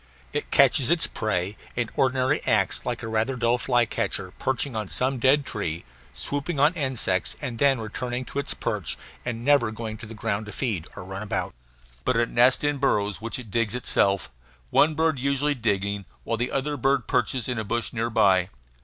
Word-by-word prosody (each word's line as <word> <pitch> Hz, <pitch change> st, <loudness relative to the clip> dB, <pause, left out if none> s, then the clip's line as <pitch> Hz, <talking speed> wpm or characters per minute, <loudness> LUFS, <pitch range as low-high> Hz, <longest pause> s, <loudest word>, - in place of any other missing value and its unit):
It 145 Hz, -, -2 dB
catches 135 Hz, -1 st, +5 dB
its 170 Hz, -2 st, +4 dB
prey 100 Hz, -2 st, -2 dB, 0.2 s
and 120 Hz, -2 st, -1 dB
ordinarily 130 Hz, +2 st, +2 dB
acts 105 Hz, -3 st, +2 dB
like 120 Hz, -1 st, -2 dB
a -, -, -3 dB
rather 110 Hz, +4 st, 0 dB
dull 120 Hz, 0 st, +2 dB
flycatcher, 120 Hz, -2 st, 0 dB
perching 135 Hz, -1 st, -1 dB
on 105 Hz, -3 st, -3 dB
some 130 Hz, 0 st, 0 dB
dead 135 Hz, +3 st, +4 dB
tree, 85 Hz, -, -4 dB, 0.3 s
swooping 145 Hz, +2 st, -2 dB
on 150 Hz, +4 st, +5 dB
insects 130 Hz, -, 0 dB
and 125 Hz, -5 st, -5 dB
then 135 Hz, -3 st, +4 dB
returning 125 Hz, +3 st, -4 dB
to 140 Hz, -, -4 dB
its 140 Hz, -, -2 dB
perch, -, -, -2 dB, 0.3 s
and 120 Hz, -1 st, -4 dB
never 140 Hz, -5 st, +4 dB
going 110 Hz, -1 st, -6 dB
on 115 Hz, -, -8 dB
the 115 Hz, -, -9 dB
ground 105 Hz, 0 st, -2 dB
to -, -, -6 dB
feed 105 Hz, -, -2 dB
or -, -, -7 dB
run 95 Hz, +2 st, -6 dB
about. 105 Hz, -, -2 dB, 0.5 s
But 125 Hz, -, +1 dB
it 115 Hz, 0 st, +2 dB
nests 125 Hz, +4 st, +4 dB
in 145 Hz, -1 st, +1 dB
burrows 105 Hz, -7 st, +1 dB
which 115 Hz, 0 st, -3 dB
it 115 Hz, -5 st, -9 dB
digs 115 Hz, 0 st, 0 dB
itself, 100 Hz, -, +1 dB, 0.4 s
one 155 Hz, +1 st, +4 dB
bird 160 Hz, -3 st, +1 dB
usually 140 Hz, +2 st, +1 dB
digging, 100 Hz, -5 st, -1 dB, 0.2 s
while 115 Hz, -, -1 dB
the 120 Hz, +2 st, -1 dB
other 145 Hz, +2 st, -1 dB
bird 135 Hz, -1 st, +2 dB
perches 125 Hz, -2 st, 0 dB
in 125 Hz, -3 st, -1 dB
a -, -, -2 dB
bush 115 Hz, +3 st, -2 dB
near 115 Hz, 0 st, -1 dB
by. 95 Hz, -5 st, +4 dB
120 Hz, 190 wpm, -25 LUFS, 110-135 Hz, 0.5 s, catches